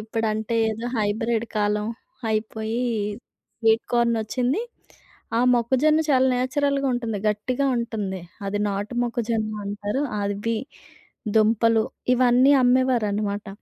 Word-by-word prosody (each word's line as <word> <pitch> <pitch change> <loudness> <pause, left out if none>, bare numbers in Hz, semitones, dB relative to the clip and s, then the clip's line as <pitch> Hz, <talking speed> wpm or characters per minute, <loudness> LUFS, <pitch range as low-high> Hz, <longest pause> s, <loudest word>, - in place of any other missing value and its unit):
ఇప్పుడంటే 220 +1 -2
ఏదో 225 +2 -5
హైబ్రిడ్ 220 +2 0
కాలం 210 0 +1 0.4
అయిపోయి 220 +2 -2 0.8
స్వీట్ 225 0 +3
కార్న్ 235 -1 +3
వచ్చింది. 250 - -1 0.8
ఆ - - +3
మొక్కజొన్న 265 +6 +3
చాలా 260 -1 +4
నేచురల్‌గా 275 +2 0
ఉంటుంది. 230 -4 -2
గట్టిగా 245 +6 -1
ఉంటుంది. 215 -5 -3 0.3
అది 205 +1 -1
నాటు 205 +4 -3
మొక్కజొన్న 230 -2 -1 0.2
అంటారు. 205 +6 -2 0.2
అవ్వి, 205 +3 -1 0.8
దుంపలు 225 +1 +4 0.3
ఇవన్నీ 255 +2 +5
అమ్మేవారన్నమాట. 220 -5 +1
225 Hz, 100 wpm, -24 LUFS, 210-245 Hz, 0.8 s, ఇవన్నీ